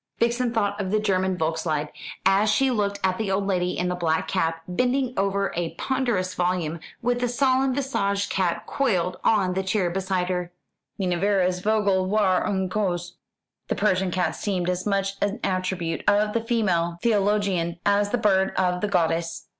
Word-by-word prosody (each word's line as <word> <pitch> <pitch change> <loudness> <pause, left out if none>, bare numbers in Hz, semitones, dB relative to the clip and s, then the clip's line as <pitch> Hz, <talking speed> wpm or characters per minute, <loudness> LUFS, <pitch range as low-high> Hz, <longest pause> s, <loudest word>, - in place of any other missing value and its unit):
Vixen 235 +1 +1
thought 205 -3 0
of 190 - -3
the 215 +2 +2
German 190 -3 0
Volkslied, 160 -2 -1 0.4
as 195 +3 +4
she 270 +4 +3
looked 200 -3 -1
at 185 +1 +1
the 215 -3 -1
old 195 +1 0
lady 180 -2 0
in 180 - 0
the 180 - 0
black 165 -3 0
cap, 165 -3 -1
bending 250 +6 0
over 195 0 0
a 170 -1 -3
ponderous 240 -9 -1
volume, 175 -3 -1 0.2
with 245 +1 +1
the 245 - +1
solemn 260 +1 +2
visaged 200 -8 -1
cat 180 -3 0
coiled 185 -9 0
on 195 -5 +3
the 190 - 0
chair 190 -2 0
beside 190 -1 -1
her. 180 -1 -2 0.5
"Minerva's 185 -1 +1
Vogel 200 -2 +1
war 195 -2 +2
ein 190 -2 0
Kauz." 180 -3 -2 0.6
The - - -1
Persian 190 -2 +1
cat 180 0 -1
seemed 180 -3 -1
as 180 +2 -3
much 195 -1 0
an 205 +3 0
attribute 185 -3 -2
of 210 +1 +2
the 230 - +1
female 185 -8 0
theologian 200 -6 +1
as 205 0 +3
the 245 - +1
bird 195 -4 +2
of 180 -1 +1
the 210 - 0
goddess. 165 -3 0
190 Hz, 170 wpm, -24 LUFS, 180-210 Hz, 0.6 s, as